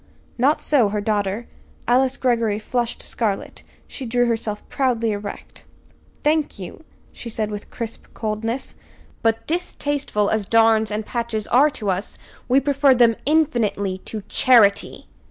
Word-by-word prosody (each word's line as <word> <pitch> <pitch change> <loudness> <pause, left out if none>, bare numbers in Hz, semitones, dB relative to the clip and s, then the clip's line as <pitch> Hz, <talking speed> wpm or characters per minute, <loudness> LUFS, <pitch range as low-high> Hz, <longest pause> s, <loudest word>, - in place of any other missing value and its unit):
Not 280 +5 +3
so 255 -8 +3
her 210 +1 -2
daughter. 205 +1 -1 0.4
Alice 255 +2 +3
Greggory 230 -5 +1
flushed 240 +2 -2
scarlet. 210 -4 -3 0.3
She 270 - -8
drew 245 +1 +2
herself 225 -3 -2
proudly 235 -4 0
erect. 205 0 -7 0.6
"Thank 305 -3 +1
you," 195 - -9 0.3
she 235 - -8
said 215 -1 -2
with 205 0 -7
crisp 230 -2 -6
coldness; 225 +3 -3 0.5
"but, 225 0 +1
distasteful 290 - -1
as 215 -3 -1
darns 225 -1 +4
and 210 0 -3
patches 230 -3 -3
are 280 +5 +5
to 205 -4 -1
us, 185 +2 -4 0.3
we 260 +2 +5
prefer 275 -1 +3
them, 235 -2 +5
infinitely, 235 -11 +1
to 215 +1 -7
charity!" 215 -6 +3
230 Hz, 135 wpm, -22 LUFS, 210-255 Hz, 0.6 s, are